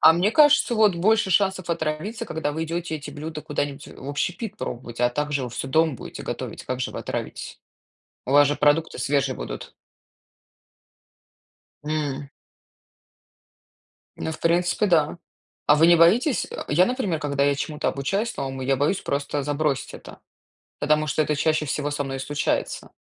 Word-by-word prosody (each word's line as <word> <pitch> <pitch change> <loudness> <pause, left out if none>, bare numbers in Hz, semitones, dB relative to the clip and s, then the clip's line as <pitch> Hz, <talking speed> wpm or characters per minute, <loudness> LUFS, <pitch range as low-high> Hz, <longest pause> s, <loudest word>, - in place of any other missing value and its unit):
А 160 - +9
мне 180 +5 +2
кажется, 295 -3 +5
вот 215 -4 +4
больше 210 +2 +3
шансов 190 -2 +1
отравиться, 160 +7 -2
когда 150 -2 -2
вы 160 +1 -2
идете 165 0 -3
эти 145 0 -8
блюда 155 +1 -6
куда-нибудь 145 -1 -3
в 135 - -10
общепит 190 +8 -3
пробовать. 120 - -6
А 120 - +4
также 145 +1 -1
вы 125 - -6
всё 130 +3 -4
дома 160 0 +3
будете - - -8
готовить. - - -5
Как 130 0 -3
же - - -2
вы - - -5
отравитесь? - - -5 0.7
У 130 - -3
вас 145 0 +7
же 145 - 0
продукты 150 +2 +2
свежие 135 0 +1
будут. - - -7 2.1
М. 145 -2 -2 1.9
Ну, 160 - -3
в - - -9
принципе, 175 +4 +2
да. 165 -2 +2 0.5
А 150 - +7
вы 160 - +6
не 170 0 +7
боитесь? 220 - +4
Э, - - -6
я, 175 +6 +4
например, 245 - -1
когда 140 -2 0
я 145 - +3
чему-то 150 +2 -2
обучаюсь 195 - -2
новому, 135 -1 -4
я 135 +1 +1
боюсь 145 +8 +1
просто 140 +1 -2
забросить 145 -1 -1
это. - - -11 0.6
Потому 150 +1 +2
что 155 - +1
это 150 0 -1
чаще 155 +1 +1
всего 145 +1 -2
со 145 -1 -2
мной 135 -1 -4
и - - -5
случается. 145 +2 -2
150 Hz, 165 wpm, -24 LUFS, 140-170 Hz, 2.1 s, А